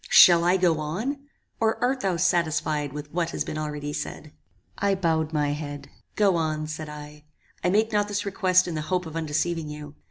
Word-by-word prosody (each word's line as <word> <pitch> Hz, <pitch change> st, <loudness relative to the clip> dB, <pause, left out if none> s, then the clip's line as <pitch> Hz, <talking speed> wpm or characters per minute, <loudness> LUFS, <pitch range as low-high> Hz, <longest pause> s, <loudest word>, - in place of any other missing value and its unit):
Shall 170 Hz, -1 st, +8 dB
I 180 Hz, +2 st, +4 dB
go 175 Hz, -4 st, +2 dB
on? 235 Hz, -, -3 dB, 0.3 s
or 225 Hz, 0 st, +2 dB
art 260 Hz, +2 st, +1 dB
thou 190 Hz, -5 st, 0 dB
satisfied 155 Hz, -4 st, +1 dB
with 150 Hz, +1 st, -7 dB
what 170 Hz, 0 st, -1 dB
has -, -, -2 dB
been 155 Hz, -, -5 dB
already 150 Hz, -1 st, -4 dB
said?" 155 Hz, 0 st, -6 dB, 0.5 s
I 200 Hz, -1 st, +2 dB
bowed 160 Hz, -4 st, 0 dB
my 150 Hz, -2 st, +1 dB
head. 145 Hz, -1 st, -6 dB, 0.2 s
"Go 195 Hz, -4 st, +3 dB
on," 155 Hz, -1 st, -1 dB
said 155 Hz, 0 st, -6 dB
I. 150 Hz, 0 st, -10 dB, 0.4 s
"I 180 Hz, -, +3 dB
make 215 Hz, +4 st, +2 dB
not 205 Hz, 0 st, +2 dB
this 205 Hz, 0 st, -2 dB
request 185 Hz, -2 st, +3 dB
in 175 Hz, -, -3 dB
the 155 Hz, -, -2 dB
hope 180 Hz, +3 st, -1 dB
of 160 Hz, -1 st, -8 dB
undeceiving 160 Hz, 0 st, -1 dB
you. 150 Hz, -1 st, -8 dB
165 Hz, 195 wpm, -25 LUFS, 150-185 Hz, 0.5 s, Shall